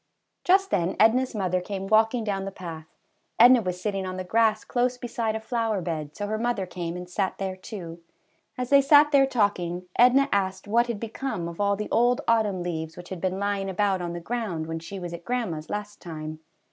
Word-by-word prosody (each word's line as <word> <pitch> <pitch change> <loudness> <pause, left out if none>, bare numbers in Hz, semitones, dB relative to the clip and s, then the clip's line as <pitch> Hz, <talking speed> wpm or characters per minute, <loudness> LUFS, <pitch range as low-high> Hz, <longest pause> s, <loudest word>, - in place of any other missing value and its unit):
Just 385 +2 +3
then 175 0 +1
Edna's 250 +3 +4
mother 185 -3 0
came 195 +1 -5
walking 225 +3 +3
down 195 -2 -2
the 195 - -4
path. 165 -4 -8 0.5
Edna 245 +1 +8
was 180 -3 -3
sitting 195 0 -2
on 185 0 -5
the 185 - -3
grass 220 +2 +2
close 245 0 0
beside 230 -2 -2
a - - -2
flower 225 -2 -1
bed, 155 -4 -4
so 205 - -3
her 215 +1 -2
mother 235 -4 -1
came 175 -1 -5
and 180 0 -7
sat 190 +1 -2
there, 190 -1 -3
too; 180 -3 -8 0.6
as 250 +1 -4
they 280 0 +7
sat 290 +2 +6
there 275 -2 +5
talking 180 -7 0
Edna 255 +3 +5
asked 190 0 -1
what 235 +3 +3
had 235 -4 -3
become 225 -5 -4
of 170 +3 -6
all 200 0 +2
the 210 +1 -4
old 240 +2 +3
autumn 210 -6 +2
leaves 160 -2 -4
which 175 0 -10
had 185 -3 -6
been 185 0 -1
lying 200 -1 -1
about 195 -1 +1
on 170 -1 -4
the 175 - -4
ground 185 -5 -3
when 165 0 -4
she 190 +4 -8
was 175 -1 -6
at 170 0 -8
grandma's 185 -9 -3
last 210 0 -5
time. 155 -2 -7
200 Hz, 210 wpm, -26 LUFS, 180-230 Hz, 0.6 s, Edna